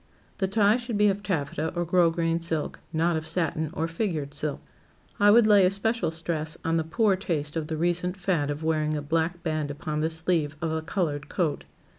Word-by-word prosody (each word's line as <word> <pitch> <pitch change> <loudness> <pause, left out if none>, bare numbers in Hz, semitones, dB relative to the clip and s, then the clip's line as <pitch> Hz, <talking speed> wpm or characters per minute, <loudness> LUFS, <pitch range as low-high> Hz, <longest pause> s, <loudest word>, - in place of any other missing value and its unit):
The 190 - +1
tie 205 +2 +3
should 235 -3 -3
be 210 0 +5
of 200 +1 -1
taffeta 160 -4 -2
or 175 0 0
grosgrain 165 -1 +2
silk, 160 -2 -2
not 165 +1 +1
of 160 0 -3
satin 160 -2 -1
or 165 -2 -1
figured 165 -5 -2
silk. 145 0 -2 0.6
I 205 0 +6
would 230 +2 +7
lay 205 -2 +6
especial 200 0 +1
stress 160 -1 -3
on 165 0 +2
the 160 - +1
poor 200 +5 +2
taste 155 -6 -3
of 160 -2 -2
the 160 -1 -3
recent 175 +2 0
fad 175 -7 0
of 145 +2 -4
wearing 155 -1 +1
a 150 - -2
black 165 +3 -1
band 155 -3 -1
upon 150 +1 -4
the 160 +1 +1
sleeve 160 -2 0
of 165 -1 -2
a 160 0 -1
colored 155 -4 -2
coat. 165 -6 -1
165 Hz, 200 wpm, -26 LUFS, 155-185 Hz, 0.6 s, would